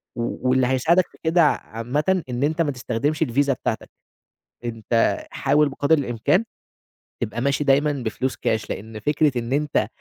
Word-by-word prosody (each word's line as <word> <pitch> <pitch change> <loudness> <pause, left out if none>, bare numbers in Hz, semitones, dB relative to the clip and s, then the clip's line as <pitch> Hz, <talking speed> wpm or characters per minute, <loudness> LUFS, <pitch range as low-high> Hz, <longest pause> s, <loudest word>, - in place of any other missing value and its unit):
و 120 +2 -2
واللي 130 -1 +3
هيساعدك 160 +8 +3
في - - -20
كده 165 +1 +4
ع 150 - +4 0.2
عامةً 150 +10 0
إن 125 +2 -2
أنت 155 +3 +1
ما 150 -3 +1
تستخدمش 130 +4 -1
الvisa 140 +4 +1
بتاعتك. 130 - -3 0.8
أنت 115 0 0
حاول 145 +2 +2
بقدر 145 +3 +2
الإمكان 135 - +1 0.8
تبقى 115 +2 -3
ماشي 140 +2 +1
دايمًا 145 +2 +3
بفلوس 130 -1 -2
كاش 110 -1 -1
لأن 110 +2 -6
فكرة 145 +1 +1
إن 120 +2 -3
أنت 150 0 +1
135 Hz, 155 wpm, -23 LUFS, 120-150 Hz, 0.8 s, كده